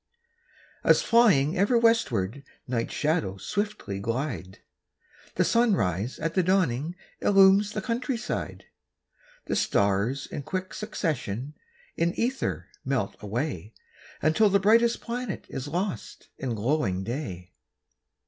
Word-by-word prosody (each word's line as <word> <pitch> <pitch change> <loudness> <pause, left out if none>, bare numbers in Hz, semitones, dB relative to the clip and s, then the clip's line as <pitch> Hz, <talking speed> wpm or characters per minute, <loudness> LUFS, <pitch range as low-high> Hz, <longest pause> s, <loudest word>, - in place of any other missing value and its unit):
As 160 - +5
flying 190 - +4
ever 205 +6 +3
westward 140 - +2 0.2
Night's 120 -2 -2
shadows 105 - -1
swiftly 205 - -3
glide, 115 - -3 0.8
The - - +3
sunrise 120 - +1
at 165 +1 -2
the 185 - +3
dawning 170 -4 +1 0.2
illumes 195 +1 +5
the 215 - -3
countryside. 240 +1 -3 0.8
The - - -1
stars 100 +7 +1
in - - -6
quick 185 +5 -4
succession 150 - -3 0.4
in 170 +1 +1
ether 255 +3 -2
melt - - -1
away, - - -4 0.5
Until 205 +7 +4
the 200 0 +4
brightest 230 +4 +4
planet 240 -4 -4
is 135 +2 -5
lost 180 +5 -4
in 125 -4 -2
glowing 105 -5 0
day. 95 - -5
160 Hz, 110 wpm, -27 LUFS, -, 0.8 s, As